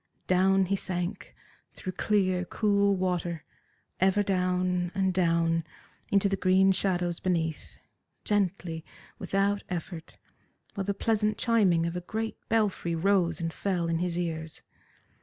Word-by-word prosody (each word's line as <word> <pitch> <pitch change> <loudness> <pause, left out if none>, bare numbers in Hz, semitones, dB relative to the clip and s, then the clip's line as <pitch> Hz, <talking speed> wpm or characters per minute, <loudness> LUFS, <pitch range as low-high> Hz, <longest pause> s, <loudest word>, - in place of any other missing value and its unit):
Down 190 +1 +3
he 195 +2 0
sank, 180 -1 -4 0.4
through 185 - -5
clear, 185 -2 +1
cool 200 +1 +2
water, 180 -3 -2 0.6
ever 190 +2 +3
down 180 -2 0
and 190 -1 +1
down 165 -2 +2 0.5
into 200 0 +3
the 195 - 0
green 190 +1 +4
shadows 180 -3 0
beneath, 165 -4 -2 0.5
gently, 185 -5 -1 0.4
without 200 +1 0
effort, 170 -2 -6 0.6
while 195 -2 -3
the 200 0 -1
pleasant 215 0 +1
chiming 195 -8 +3
of 170 +1 -3
a 180 - -3
great 220 +5 -4
belfry 205 -6 +1
rose 175 -2 +2
and 165 -1 -3
fell 180 -4 -1
in 165 0 0
his 175 -1 -1
ears. 160 -2 -4
185 Hz, 130 wpm, -28 LUFS, 170-195 Hz, 0.6 s, green